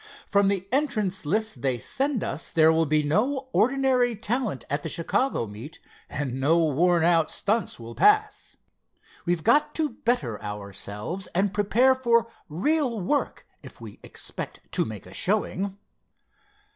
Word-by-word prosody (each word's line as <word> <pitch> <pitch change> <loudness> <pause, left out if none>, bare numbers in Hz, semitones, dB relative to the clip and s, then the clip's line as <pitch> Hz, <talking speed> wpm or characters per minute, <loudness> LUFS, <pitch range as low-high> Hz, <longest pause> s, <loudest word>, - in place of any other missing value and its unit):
"From 200 0 +2
the 195 -1 -1
entrants' 215 - 0
list 220 +6 0
they 130 -3 0
send 265 - -1
us 140 - -2
there 160 -1 +5
will 160 0 +2
be 155 +1 +2
no 260 - 0
ordinary 255 -1 +2
talent 215 - -2
at 145 +2 -2
the 160 - -4
Chicago 170 - 0
meet 110 +9 -10 0.3
and 135 -3 -3
no 150 +5 +3
worn 165 +2 +2
out 165 -2 +3
stunts 210 - -1
will 115 0 -9
pass. 420 - +2 0.7
We've 175 -2 0
got 290 +7 +3
to 315 -2 +1
better 220 - -2
ourselves 105 - -5
and 195 +1 +1
prepare 225 +6 +3
for 235 -3 +2 0.2
real 245 - 0
work, 280 +11 -1 0.2
if - - -13
we - - -11
expect - - -5
to - - +1
make - - -8
a - - -12
showing." 195 0 0
195 Hz, 145 wpm, -25 LUFS, 155-250 Hz, 0.7 s, there